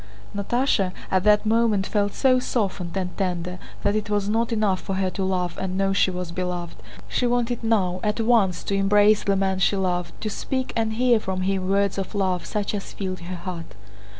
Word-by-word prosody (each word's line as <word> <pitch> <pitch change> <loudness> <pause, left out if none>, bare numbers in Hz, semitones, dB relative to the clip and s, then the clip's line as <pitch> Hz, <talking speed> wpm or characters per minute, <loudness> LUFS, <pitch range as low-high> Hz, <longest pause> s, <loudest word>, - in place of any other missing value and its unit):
Natásha 200 -2 +1 0.2
at 185 -1 +2
that 210 0 +5
moment 220 -3 +2
felt 205 -1 0
so 255 -2 +4
softened 195 -7 -2
and 180 -2 -3
tender 180 -1 -2 0.2
that 205 +1 +2
it 215 -1 -2
was 205 -1 0
not 230 +3 +1
enough 210 -4 +1
for 195 - -3
her 190 -1 0
to 195 - -3
love 180 -2 -1
and 190 -1 -2
know 195 0 +2
she 195 - +3
was 180 -2 -4
beloved, 175 -1 -4 0.3
she 245 - 0
wanted 240 -1 0
now, 190 -5 +1
at 210 +1 -1
once, 220 -6 +2
to - - -2
embrace 205 +2 +4
the 200 - +2
man 190 -1 0
she 195 - +3
loved, 180 -2 -2
to - - -3
speak 260 +5 -3
and 225 -1 0
hear 240 0 +3
from 190 -3 -3
him 190 0 0
words 200 0 +1
of 195 +2 -5
love 185 -3 0
such 210 -1 -2
as 200 -2 -5
filled 185 -2 -4
her 180 +1 -6
heart. 170 - -7
195 Hz, 205 wpm, -24 LUFS, 185-215 Hz, 0.3 s, that